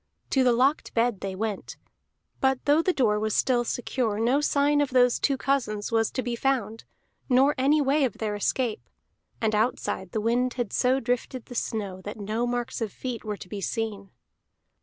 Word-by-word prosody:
To 265 - +3
the 250 - +4
locked 260 +5 +1
bed 230 -3 +2
they 195 -1 -4
went, 210 0 -4 0.6
but 265 -1 +1
though 295 +2 +4
the 370 - +2
door 220 -10 +2
was 215 0 -1
still 245 -2 +2
secure, 235 -3 -2
no 250 +6 +2
sign 290 0 +2
of 285 - 0
those 250 -1 +4
two 275 - +1
cousins 235 -7 -1
was 225 -1 +2
to 255 - -2
be 240 0 -2
found, 230 -4 -1 0.4
nor 265 +3 +5
any 290 +3 +3
way 285 +2 +2
of 255 - +1
their 215 -2 -2
escape. 220 +3 -1 0.5
And 220 -1 +1
outside 210 -4 -1
the 220 - -1
wind 240 +3 +1
had 240 -5 -3
so 255 +2 +2
drifted 245 0 -2
the - - -10
snow 200 -5 -3
that 205 +3 -7
no 215 +4 -2
marks 245 0 -3
of 220 -3 -2
feet 250 +1 -5
were 210 -1 -4
to - - -10
be 200 +2 -6
seen. 205 -1 -3
240 Hz, 190 wpm, -26 LUFS, 215-265 Hz, 0.6 s, nor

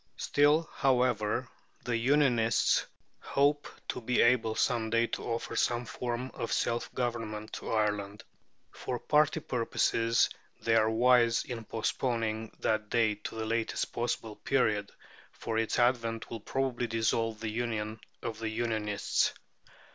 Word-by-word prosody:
Still, 150 +3 +3
however, 125 -3 +1 0.4
the 120 - 0
"Unionists" 120 -2 +3 0.3
hope 145 +1 +1 0.2
to 125 - -3
be 125 +1 0
able 115 -2 +4
some 115 -2 +1
day 115 +1 +3
to - - -5
offer 115 -1 -3
some 120 0 +1
form 125 +2 -4
of 115 - -4
self 120 0 0
government 115 -3 -3
to - - -5
Ireland. 105 -2 -1 0.5
For 125 - -4
party 150 +4 +2
purposes 115 -1 +1 0.3
they 115 - +1
are 110 -1 +4
wise 120 0 +4
in 115 -3 -6
postponing 115 -1 -2
that 110 -1 0
day 115 -2 +3
to 105 - -8
the 110 0 -3
latest 115 0 -1
possible 115 -2 -2
period, 105 -7 +1 0.4
for 115 -1 -2
its 115 - 0
advent 115 -2 +1
will 115 - -4
probably 125 +1 -1
dissolve 115 -1 0
the 110 -1 -3
union 110 -2 -3 0.2
of 115 -2 -4
the 110 -1 -2
"Unionists." 110 -2 0
115 Hz, 135 wpm, -30 LUFS, 110-125 Hz, 0.5 s, able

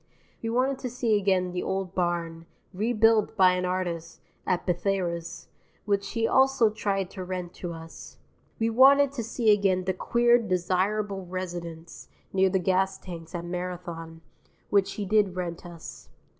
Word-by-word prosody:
We 230 - -3
wanted 260 +3 +1
to 250 - -4
see 235 -2 +1
again 190 -3 +1
the 180 0 -3
old 190 -1 -3
barn, 170 -2 -2 0.3
rebuilt 220 +1 +2
by 185 -2 +6
an 180 0 -1
artist, 175 -2 -3 0.3
at 180 - 0
Bethayres, 175 -2 -2 0.4
which 200 -1 -1
he 225 -1 +1
also 265 -4 +4
tried 195 -3 -2
to 190 - -6
rent 180 -1 -5
to 175 - -3
us. 165 0 -10 0.4
We 225 0 0
wanted 275 +3 +6
to 260 -4 -4
see 225 -1 +3
again 195 -3 +2
the 190 +1 0
queer 240 +5 +3
"desirable 195 0 -1
residence" 170 -2 -6 0.3
(near 190 0 +4
the 190 - +1
gas 190 +1 +1
tanks 165 -2 -9
at 170 0 -4
Marathon) 175 -2 -6 0.5
which 200 -2 +2
he 205 - -4
did 200 -2 +2
rent 175 -1 -5
us. 170 -2 -11
185 Hz, 155 wpm, -27 LUFS, 175-215 Hz, 0.5 s, by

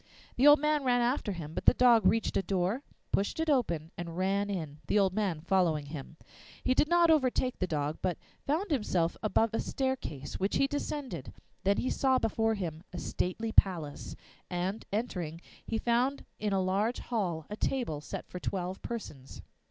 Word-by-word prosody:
The 265 +4 +5
old 290 0 +10
man 300 0 +1
ran 245 -1 +3
after 240 -3 0
him, 160 -4 -6
but - - -4
the - - +8
dog 235 -5 +6
reached 225 - +2
a - - +3
door, 195 +5 0 0.3
pushed 200 +10 0
it 320 -1 +2
open, 170 - 0
and 170 -1 -6
ran 195 +2 +1
in, 155 -7 -4
the - - +2
old 195 -2 +3
man 190 -7 -1
following 170 -4 +2
him. 145 +1 -8 0.5
He 255 - +3
did 295 - +3
not 345 0 +5
overtake 260 -4 +2
the 185 - 0
dog, 150 -2 -2
but 180 -3 0 0.3
found 325 +7 0
himself 185 - +1
above 225 +1 +2
a - - 0
staircase, 255 - -3
which 195 +2 0
he 275 - +4
descended. 275 - -4 0.3
Then 200 +1 +3
he 255 - 0
saw 265 -1 +3
before 225 -1 +1
him 165 -5 -4
a 180 - -6
stately 220 +6 -2
palace, 170 -9 +1 0.3
and, 185 +4 -2
entering, 180 -7 -2 0.3
he 225 - -1
found 245 +5 +1
in 210 0 -1
a 190 -1 +2
large 200 +6 +1
hall 180 -10 -2
a - - -2
table 215 - -1
set - - -6
for 180 - -7
twelve 185 0 -3
persons. 150 - -7
200 Hz, 185 wpm, -31 LUFS, 175-250 Hz, 0.5 s, old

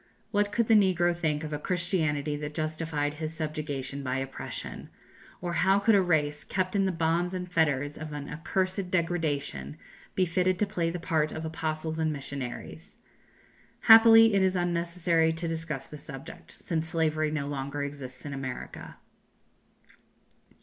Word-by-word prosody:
What 205 -1 +1
could 235 +2 +2
the 225 - +4
negro 180 -4 +4
think 155 -3 -1
of 155 -1 -5
a 150 - -2
Christianity 160 -4 0
that 150 0 -6
justified 155 -2 -2
his 155 +1 -5
subjugation 145 -4 -3
by 130 -1 -2
oppression? 135 0 -5 0.5
Or 175 -1 -3
how 190 +3 +4
could 200 +3 +3
a 200 - +6
race, 150 -4 +1
kept 185 0 -2
in 195 -1 +3
the 190 - +1
bonds 170 +2 0
and 180 -1 -4
fetters 150 -4 0
of 155 0 -6
an 145 -1 -5
accursed 185 +4 -2
degradation, 155 - -1 0.4
be 185 - +3
fitted 180 +2 +1
to 210 - +2
play 170 -4 -1
the 175 +1 -4
part 160 -3 0
of 160 - -5
apostles 160 0 -3
and 160 -1 +1
missionaries? 140 -3 -6 0.8
Happily 225 0 +8
it 195 - +4
is 190 0 +2
unnecessary 170 -1 +1
to 165 +1 -4
discuss 160 -4 -3
the 150 - -10
subject, 135 -2 -10
since 160 -1 -3
slavery 155 -1 +1
no 150 -2 -2
longer 140 0 -3
exists 140 -3 -7
in 145 - -5
America. 130 -2 -6
160 Hz, 155 wpm, -28 LUFS, 150-180 Hz, 0.8 s, Happily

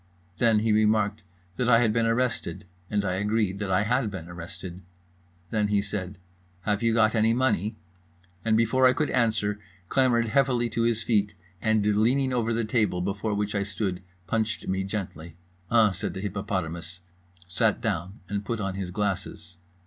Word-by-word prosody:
Then 115 -3 +4
he 110 0 +2
remarked 105 0 +2 0.4
that 125 -1 +1
I 115 - +7
had 115 -2 +3
been 115 0 +2
arrested, 115 -8 -1 0.2
and 100 -1 0
I 90 -1 0
agreed 105 -1 0
that 100 -2 -3
I 95 +2 +3
had 120 +1 +1
been 90 -4 -7
arrested. 85 +1 -8 0.7
Then 105 -2 +1
he 105 0 +2
said 100 -1 -4 0.4
"Have 105 +2 0
you 115 0 +3
got 110 -1 +4
any 110 0 +3
money?" 115 -4 +1 0.7
and 110 -1 +3
before 130 +3 +4
I 125 - +5
could 155 -1 -1
answer 110 -4 +1 0.3
clambered 120 -4 +3
heavily 125 -2 +2
to 115 - -1
his 115 -1 +1
feet 105 -3 +1 0.3
and, 110 -2 +2
leaning 120 +6 +2
over 115 -2 0
the 115 0 0
table 105 -5 +1
before 100 +3 -2
which 105 0 -1
I 100 - 0
stood, 100 -2 -3 0.2
punched 110 +2 -1
me 95 0 0
gently. 85 -5 -5 0.3
"Uh," 115 -3 +5
said 90 - -4
the 95 - -4
hippopotamus, 90 -4 -4 0.5
sat 110 +5 +2
down, 95 -1 -3
and 100 0 -3
put 115 +2 -3
on 95 -2 -2
his 95 -1 -4
glasses. 90 -3 -3
105 Hz, 170 wpm, -26 LUFS, 95-115 Hz, 0.7 s, I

